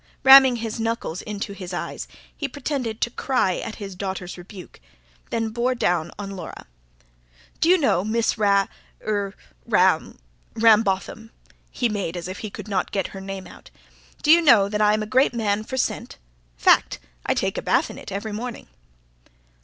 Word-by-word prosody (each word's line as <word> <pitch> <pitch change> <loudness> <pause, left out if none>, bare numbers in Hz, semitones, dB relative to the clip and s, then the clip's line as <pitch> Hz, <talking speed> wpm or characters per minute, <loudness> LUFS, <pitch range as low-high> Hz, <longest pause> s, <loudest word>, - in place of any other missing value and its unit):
Ramming 265 -1 +9
his 225 -1 -4
knuckles 225 -6 -2
into 205 -1 -5
his 185 -3 -7
eyes, - - -5 0.3
he 285 - -3
pretended 255 -5 -4
to 235 - 0
cry 250 -9 0
at 220 - -5
his 200 -2 -7
daughter's 190 -1 -5
rebuke; 180 +1 -12 0.5
then 225 -1 -1
bore 240 +3 0
down 175 -7 0
on 200 -1 -6
Laura. 190 -2 -8 0.9
"D'you 355 +3 +5
know, 270 - +2
Miss 225 +2 0
Ra... 200 -3 +3 0.4
Ra... 195 - +1 0.6
Rambotham" 220 -1 +2 0.4
he 245 - 0
made 200 -5 -3
as 175 - -5
if 185 - -6
he 215 - -5
could 210 +1 -9
not 195 -3 -1
get 195 -2 -1
her 195 - -9
name 195 -1 -6
out - - -14 0.5
"d'you 325 +3 +6
know 235 -11 +6
that 210 +1 -2
I'm 210 0 +3
a - - -4
great 255 +2 +2
man 215 -2 0
for 260 +4 -5
scent? - - -2 0.4
Fact. - - +4 0.3
I - - +2
take - - -1
a - - -5
bath - - +1
in - - -10
it - - -10
every 200 +3 -4
morning." 235 +2 -6
210 Hz, 165 wpm, -23 LUFS, 195-235 Hz, 0.9 s, Ramming